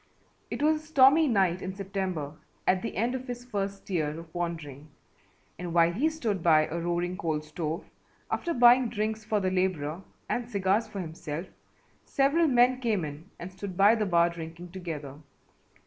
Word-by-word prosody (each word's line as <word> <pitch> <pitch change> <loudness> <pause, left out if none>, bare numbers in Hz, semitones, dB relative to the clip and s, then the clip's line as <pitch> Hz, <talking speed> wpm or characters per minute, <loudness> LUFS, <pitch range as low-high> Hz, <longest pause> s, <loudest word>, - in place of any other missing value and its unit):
It - - -3
was 310 +1 +4
a - - -18
stormy 300 +1 +6
night 190 -7 +2
in 185 +1 -5
September 190 -7 -3 0.3
at 185 0 +3
the - - -5
end 235 +5 +1
of 260 0 -5
his 245 0 -6
first 200 -4 -4
year 155 -5 -1
of 165 -1 -13
wandering 160 -5 -5 0.7
and 175 -1 -5
while 170 0 +5
he 280 - +2
stood 225 - -2
by 155 -2 +5
a 170 - -4
roaring 175 +1 -1
coal 160 -4 -1
stove, 155 +2 -4 0.5
after 340 - -1
buying 245 0 +6
drinks 220 0 -2
for 215 -1 0
the 185 -1 0
labourer 180 -3 -1 0.3
and 240 -1 -2
cigars 200 +1 +1
for 200 -2 -5
himself, 160 0 -5 0.6
several 290 +5 +2
men 250 -1 +4
came 215 -8 0
in 150 +5 -9
and 175 +2 -7
stood 190 -1 -7
by 205 +3 +7
the 215 -3 0
bar 170 -1 +3
drinking 170 +1 -8
together. 155 -6 -6
185 Hz, 175 wpm, -28 LUFS, 170-230 Hz, 0.7 s, by